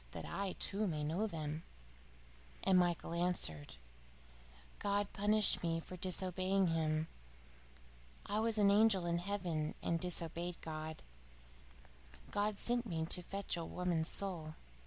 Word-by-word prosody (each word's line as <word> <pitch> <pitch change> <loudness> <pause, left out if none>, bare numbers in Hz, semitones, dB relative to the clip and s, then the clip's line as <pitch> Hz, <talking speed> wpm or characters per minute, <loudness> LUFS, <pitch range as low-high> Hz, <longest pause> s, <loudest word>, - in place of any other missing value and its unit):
that - - -5
I, 195 -1 -2
too, 205 +2 0
may 155 -4 -2
know 170 +9 0
them." 155 -4 -4 1.0
And 190 -1 +5
Michael 175 -1 0
answered: 170 - 0 1.0
"God 205 0 0
punished 210 +1 +3
me 165 -1 0
for 180 - -8
disobeying 185 +1 +1
Him. 155 -1 +1 1.2
I 205 +1 0
was 225 0 +1
an 200 -1 +5
angel 205 -3 +4
in 170 0 +1
heaven 175 -5 -2
and 165 - +1
disobeyed 170 0 -2
God. 155 0 -5 1.3
God 205 0 0
sent 240 +1 +1
me 160 -4 -1
to 180 - +5
fetch 195 +2 -3
a 170 - -3
woman's 170 -1 0
soul. 165 -6 0
180 Hz, 130 wpm, -37 LUFS, 165-200 Hz, 1.3 s, And